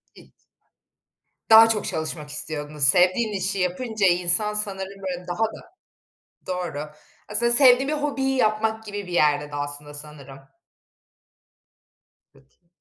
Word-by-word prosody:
Hiç - - -18 1.2
Daha 225 0 +8
çok 215 -2 -1
çalışmak 155 -1 -5
istiyordunuz. 150 -1 -4
Sevdiğin 185 - +3
işi 195 0 -2
yapınca 200 +4 -2
insan 180 +4 +2
sanırım 195 -2 -3
böyle 180 -2 -6
daha 175 +5 -2
da 350 +11 -11 0.7
Doğru. 170 -5 -5 0.4
Aslında 235 +3 +4
sevdiğin 260 +1 +6
bir - - -1
hobiyi 275 -3 -2
yapmak 220 -1 -1
gibi 205 -2 -7
bir 180 - -9
yerde 150 -3 +1
de - - -5
aslında 145 0 -6
sanırım. 145 -2 -11 2.0
Peki. 65 - -28
185 Hz, 120 wpm, -23 LUFS, 150-220 Hz, 2.0 s, Daha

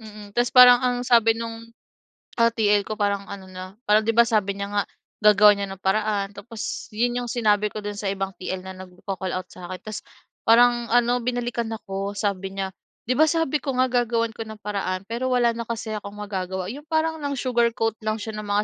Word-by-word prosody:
Mm, 210 -2 -11
tapos 240 +2 +1
parang 250 -1 +9
ang 250 -1 +1
sabi 230 -2 +4
no'ng, 230 0 -6 0.7
ah, 230 0 +5
TL 210 -3 +2
ko 215 +2 -6
parang 200 -1 0
ano 195 -1 -8
na, 185 +1 -10
parang 210 +1 +4
'di 225 - +1
ba 235 +1 +5
sabi 210 -4 +1
niya 200 0 -3
nga 205 0 0 0.4
gagawa 210 -1 +7
niya 200 0 -3
ng 195 0 -9
paraan 205 0 +1
tapos 215 +2 -6
'yon 240 +3 0
'yong 240 - -6
sinabi 210 -4 +2
ko 215 - -5
do'n 205 0 -4
sa 200 -1 -2
ibang 195 0 -3
TL 185 0 -5
na 190 0 -7
nagko-call-out 185 0 -5
sa 180 -1 -10
akin. 185 0 -6
Tapos 215 -1 -6 0.4
parang 240 +1 +5
ano 245 +1 +3
binalikan 240 -1 -2
ako, 200 -2 -5
sabi 195 -2 -2
niya, 195 -1 -3 0.4
"Di 255 - +1
ba, 315 - +6
sabi 315 -2 +1
ko 270 -2 -2
nga 255 - +4
gagawan 235 -2 +1
ko 225 - -5
ng 220 -1 -9
paraan 195 -2 -2
pero 235 +3 -2
wala 240 -1 +3
na 235 - -3
kasi 225 -1 -4
akong 200 -1 -7
magagawa," 190 -2 -4
'yong 290 +4 -10
parang 320 0 0
nang 285 -1 -3
sugarcoat 235 -3 +1
lang 215 0 0
siya 220 +1 -6
ng 210 - -7
mga 205 +1 +1
215 Hz, 210 wpm, -24 LUFS, 200-240 Hz, 0.7 s, parang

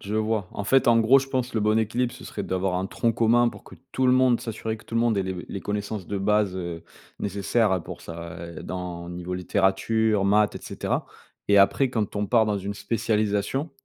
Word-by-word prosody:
Je 100 +2 -5
vois, 110 -2 0
en 100 - -4
fait, 135 +5 +3
en 120 -1 +6
gros, 125 +5 +6
je 135 - -3
pense 130 -2 -2
le 110 - +1
bon 105 +1 +2
équilibre 115 +3 0
ce - - -12
serait - - -5
d'avoir 95 0 -1
un 95 +1 -1
tronc 115 +4 0
commun 120 +1 +3
pour - - -10
que - - -13 0.2
tout 130 0 +1
le 125 - +5
monde, 130 -2 +4
s'assurer 110 0 -4
que 110 - -18
tout - - -9
le 115 - +3
monde 115 -3 +2
ait 95 - 0
les 95 -1 -4
les 100 - -5
connaissances 105 -1 -4
de 100 - -3
base, 105 -1 +1
heu, 85 -2 -5 0.3
nécessaires 100 +2 +1
à 90 -2 0
pour - - -9
ça 85 0 -8 0.2
et - - -8
dans 90 -2 -6
niveau 90 +1 -5
littérature, 100 +3 +1
maths 105 +1 +3
et - - -6
cetera - - -2 0.4
et 100 0 +6
après 110 +7 +4
quand 110 -5 -2
on 105 0 -1
part 115 0 +3
dans 105 -1 0
une 100 +1 -4
spécialisation, 110 +6 -1
105 Hz, 230 wpm, -25 LUFS, 95-115 Hz, 0.4 s, en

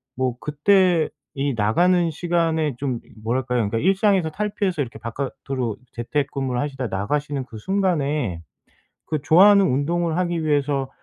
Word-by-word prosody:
뭐 130 -1 -1
그때 175 +2 +3 0.3
이 140 -1 -1
나가는 170 - +3
시간에 165 -2 0
좀 130 -4 -2
이 - - -21
뭐랄까요. 125 +2 0
그러니까 115 - -1
일상에서 190 - +2
탈피해서 200 -3 -1
이렇게 125 -3 -5
바깥으로 130 -1 -4 0.2
재택근무를 130 +1 -2
하시다가 135 -7 -3
나가시는 140 +6 -2
그 115 -3 -11
순간에 150 - 0 0.6
그 155 -3 -2
좋아하는 195 +6 +6
운동을 165 +5 0
하기 175 -2 -1
위해서 140 -2 0
145 Hz, 355 characters per minute, -22 LUFS, 130-175 Hz, 0.6 s, 좋아하는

